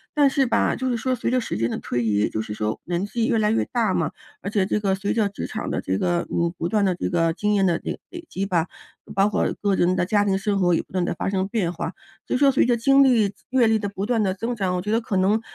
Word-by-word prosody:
但 290 -2 +5
是 270 -1 +1
吧， 235 - +2
就 260 0 -2
是 240 - 0
说 255 +3 -1
随 245 - -2
着 255 +1 +2
时 235 - -4
间 115 +2 0
的 - - -3
推 120 - -2
移， 105 -2 +2
就 110 - -2
是 110 - -7
说 105 +1 -2
年 175 +2 -1
纪 225 +2 -1
越 - - +2
来 210 -1 +2
越 225 - +2
大 225 -6 +1
嘛， 165 -4 0 0.3
而 200 - -4
且 200 -2 +1
这 210 - 0
个 195 -2 +1
随 200 +1 -2
着 215 -3 +1
职 200 - -6
场 - - -4
的 - - -2
这 95 +1 -1
个 175 -1 0
嗯， 170 0 +1
不 165 - -2
断 210 +3 +1
的 185 -2 +2
这 - - -3
个 165 -2 +2
经 210 +5 0
验 195 -2 +3
的 170 -2 +1
累 - - -4
累 345 -1 -9
积 195 - -3
吧， 170 -4 +1 0.5
包 195 +1 +3
括 210 - +1
个 200 -2 +2
人 180 0 +2
的 175 - +1
家 205 0 +2
庭 195 -1 +2
生 200 0 -1
活 175 -2 +3
也 165 - +2
不 - - -23
断 180 -1 0
地 - - -1
发 - - -3
生 190 -1 0
变 195 -5 -1
化。 175 0 -5 0.3
所 - - -2
以 - - +3
说， 280 -1 +5
随 265 - +3
着 240 -1 +3
经 275 +4 +5
历 220 -6 +3 0.2
阅 255 -3 +4
历 220 0 +3
的 205 - -2
不 200 0 -4
断 235 -2 +1
地 190 -2 +1
增 230 +6 -3
长， 190 -4 -1
我 180 - -1
觉 210 +3 -3
得 225 - +3
可 220 -3 -4
能 195 +4 +2
200 Hz, 325 characters per minute, -23 LUFS, 180-225 Hz, 0.5 s, 但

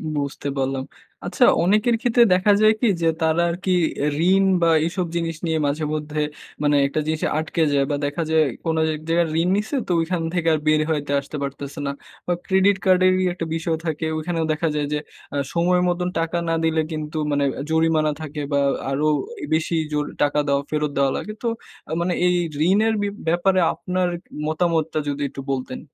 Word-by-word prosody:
বুঝতে 140 0 -3
পারলাম। 135 0 -1 0.4
আচ্ছা - - +3 0.2
অনেকের 215 +5 +3
ক্ষেত্রে 240 0 +4
দেখা 185 +3 +3
যায় 215 0 +6
কি? 240 - +3
যে, 165 - +2
তারা 160 +1 +2
আরকি 185 +2 -2 0.3
এ - - +2 0.3
ঋণ 195 0 +4 0.2
বা 165 - +4 0.2
এসব 180 0 -2
জিনিস 165 -1 -1
নিয়ে 160 -1 0
মাঝে 150 +2 -1
মধ্যে, 150 0 -2 0.4
মানে 145 0 +3
একটা 145 - -2
জিনিস 155 0 -1 0.2
আটকে 160 +1 -1
যায় 140 -1 +3
বা - - +1
দেখা 145 +4 -2
যায়, 160 -1 +4 0.2
কোন 160 0 +1 0.2
এক 155 - -9
জায়গায় 170 0 +2
ঋণ 180 - +1
নিছে, 215 +7 -2
তো - - -2
ঐখান 170 +1 -1
থেকে 170 -2 -1
আর 155 - +1
বের 155 0 +4
হইতে 145 -2 -2
আসতে 140 +2 -7
পারতেছে 140 +2 -6
না - - 0 0.4
বা - - 0
Credit 190 +1 +3
card 185 -1 +5
এরই 185 0 +3
একটা 170 -2 -4
বিষয় 165 0 -1
থাকে, 160 0 -2
ওখানেও 165 0 -2
দেখা 165 +2 -1
যায় 145 -1 -1
যে, - - +1 0.4
আ - - -1 0.2
সময় 180 +1 +2
মত 175 0 0 0.2
টাকা 165 +1 -1
না 165 - +2
দিলে 160 0 +2
কিন্তু, 155 0 -4
মানে 145 0 +1 0.3
জরিমানা 160 -1 +2
থাকে 150 -1 -5
বা 140 - +3 0.3
আরো 145 +3 0 0.5
বেশি 160 +1 0 0.2
জোর 150 0 0 0.2
টাকা 145 +1 +2
দেওয়া, 140 0 +2
ফেরত 150 -1 0
দেওয়া 135 -1 +3
লাগে। 215 - -5
তো - - 0 0.4
আ - - -7
মানে 175 0 0
এই 180 0 +3 0.3
ঋণের 220 +3 +3
বি 205 - 0 0.2
ব্যাপারে 185 +3 +2
আপনার 180 0 -1 0.4
মতামতটা 160 -1 0
যদি 145 0 -2
একটু 135 - -8
বলতেন? 130 -1 -3
160 Hz, 190 wpm, -22 LUFS, 150-180 Hz, 0.5 s, যায়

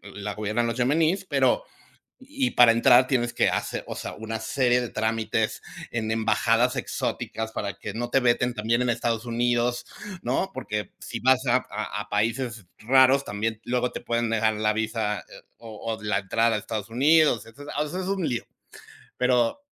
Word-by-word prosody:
la 105 0 -4
gobiernan 110 +3 -1
los 115 - -2
yemeníes, 160 +8 +2
pero - - +2 0.6
y 270 -1 -2
para 120 -2 +7
entrar 120 +2 +5
tienes 120 -3 0
que - - +2
hace, - - -2
o - - -4
sea, - - -6
una 110 0 -5
serie 125 +1 +2
de 120 - -3
trámites 110 0 -1 0.3
en 110 -2 -2
embajadas 115 +3 +2
exóticas 110 -2 -3
para 100 -3 -3
que 100 0 -6
no 120 +2 -3
te 135 - +3
veten 125 0 +2
también 115 +3 0
en 125 - 0
Estados 115 -1 -1
Unidos, 120 0 0 0.4
¿no? 190 - 0
Porque 105 -2 -4
si - - -6
vas 130 +1 +3
a 125 +1 +5
a 105 0 -4
países 115 -1 -1
raros, 130 +4 +4
también 110 +2 -3
luego 125 0 0
te - - -5
pueden 115 -1 -1
degar 110 -1 +2
la 105 0 +1
visa 110 -1 -2 0.3
o 115 0 -6
o 110 - -15
la 105 0 +1
entrada 115 +3 +1
a - - 0
Estados 110 0 -5
Unidos, 145 +1 +4
o - - -13
sea, 115 +2 -13 0.4
eso 185 +2 -3
es 185 - -5
un 195 -3 -1
lío. 120 -3 -2 0.7
Pero 125 - +2
115 Hz, 175 wpm, -25 LUFS, 110-125 Hz, 0.7 s, para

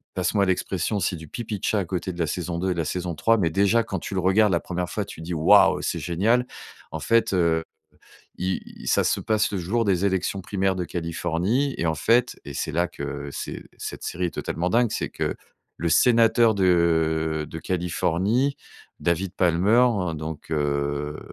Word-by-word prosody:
passe 90 +3 -1
moi 100 -1 +4
l'expression, 95 +2 -1
c'est 90 0 0
du 80 -2 -10
pipi 110 +3 -5
de - - -24
chat 105 - +2
à 95 - -1
côté 90 +1 -3
de 85 - -11
la 80 - +1
saison 85 +1 -3
2 95 - -1
et - - +2
de - - -3
la 80 - 0
saison 90 -2 -3
3. 115 +9 +3
Mais 85 -6 +1
déjà 100 +6 +3
quand 100 -5 -4
tu 100 - -6
le - - +1
regardes 95 +3 +3
la 85 - +2
1re 90 0 -4
fois 105 - -3
tu 80 - -10
dis: 85 +2 -5
«Waouh 80 - +5
c'est - - -1
génial!» 105 - +1 0.4
En - - -4
fait, 115 -2 +2
heu, 85 -3 +2 0.7
il 95 +1 -4
ça - - +3
se - - +1
passe 110 -1 +1
le - - 0
jour 100 +7 0
des 95 -1 +2
élections 95 0 0
primaires 95 0 0
de 90 - -1
Californie, 85 - -1
et 85 - -1
en 80 -1 +1
fait, 115 - +2
et - - -7
c'est - - -3
là 85 +2 +1
que 70 -1 -6
c'est - - -6
cette - - -6
série 90 +2 -2
est - - -6
totalement 90 +2 -2
dingue, 120 0 +2
c'est - - -2
que - - -2 0.4
le 85 - -2
sénateur 115 +2 +5
de 80 -4 +2
de 80 - -6
Californie, 95 - 0 0.4
David 85 +2 0
Palmer, 95 +8 +4 0.3
donc, 80 0 -7
heu, 75 0 -1
90 Hz, 200 wpm, -24 LUFS, 80-105 Hz, 0.7 s, Waouh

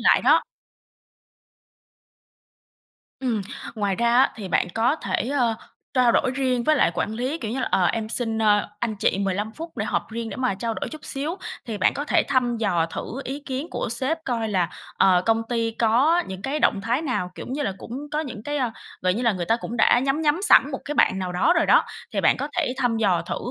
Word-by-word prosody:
lại - - +4
đó. - - +5 2.8
Ừm, 240 -5 0 0.3
ngoài 200 -3 -1
ra 235 0 +2
á 265 - +5
thì 200 -4 -6
bạn 180 - +1
có 240 +7 +2
thể, 235 - -2
ơ, 245 -5 +1 0.4
trao 250 -2 +4
đổi 255 - +2
riêng 255 -3 0
với 310 +3 +4
lại - - +3
quản 215 - -2
lý, 255 +7 -2
kiểu 220 -7 -4
như 265 +3 -2
là - - -1
"Ờ, 185 - +3
em 220 +2 -1
xin, 225 -1 -2
ơ, 205 -1 +3
anh 220 -3 -2
chị 195 - +1
15 200 +2 -1
phút 330 +6 -9
để - - -1
họp - - -2
riêng 230 0 -4
để - - -6
mà 255 -6 0
trao 225 +3 -3
đổi - - -4
chút 310 - -10
xíu." 300 +6 -2 0.3
Thì 215 -3 -4
bạn - - +3
có 290 - -3
thể - - +3
thăm 250 -3 +1
dò 175 -7 +1
thử - - -5 0.2
ý 275 +3 -5
kiến 270 +3 -3
của - - -3
sếp 265 +7 -1
coi 230 -3 -1
là, 180 -4 +1 0.3
ờ, 180 -2 +5
công 225 0 +3
ty 230 -2 0
có 270 +10 +3
những 190 +1 -7
cái 280 +3 -2
động 195 - +3
thái 240 +7 0
nào, 245 - -2
kiểu - - -8
như 285 +3 -2
là, 195 - -1
cũng 245 +4 -7
có 300 - 0
những 255 -8 -6
cái, 290 +3 -3
ơ 250 -4 0 0.3
gọi 180 0 +2
như 240 - -2
là, 230 - +3
người 175 -3 -4
ta 225 - +3
cũng 235 0 -6
đã 240 +2 +5
nhắm 270 +4 0
nhắm 305 +4 +2
sẵn 295 -8 +6
một 265 - -4
cái 295 - -4
bạn 190 - +3
nào 185 -1 -3
đó 185 - +3
rồi 330 - +3
đó, - - +5 0.3
thì - - 0
bạn - - +4
có 285 - -3
thể 300 -8 +1
thăm 245 -4 +1
dò 195 -6 +2
thử - - -4
235 Hz, 235 wpm, -24 LUFS, 215-270 Hz, 2.8 s, sẵn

